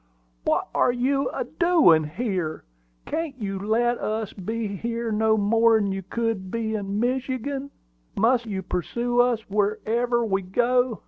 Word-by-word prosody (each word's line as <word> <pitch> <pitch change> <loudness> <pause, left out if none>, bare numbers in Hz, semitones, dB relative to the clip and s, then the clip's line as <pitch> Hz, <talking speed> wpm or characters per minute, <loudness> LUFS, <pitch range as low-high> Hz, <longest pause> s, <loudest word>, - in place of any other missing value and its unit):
"What - - +1
are - - +3
you 270 +3 0
a - - -3
doin' 320 - +4
here? 180 -2 -3 0.4
Can't 315 -5 -3
you 195 -3 -3
let 235 +4 +1
us 215 -1 -3
be 220 +4 -4
here 230 +3 -3
no 220 +1 +2
more'n 220 0 +3
you 195 0 -3
could 195 -1 -3
in 215 -3 -2
Michigan? 260 +3 -2 0.5
Must 235 +2 +3
you 195 -3 -3
pursue 235 +8 -1
us 240 -3 0
wherever 225 +4 0
we 195 -2 0
go?" 240 +5 +1
225 Hz, 135 wpm, -25 LUFS, 200-245 Hz, 0.5 s, doin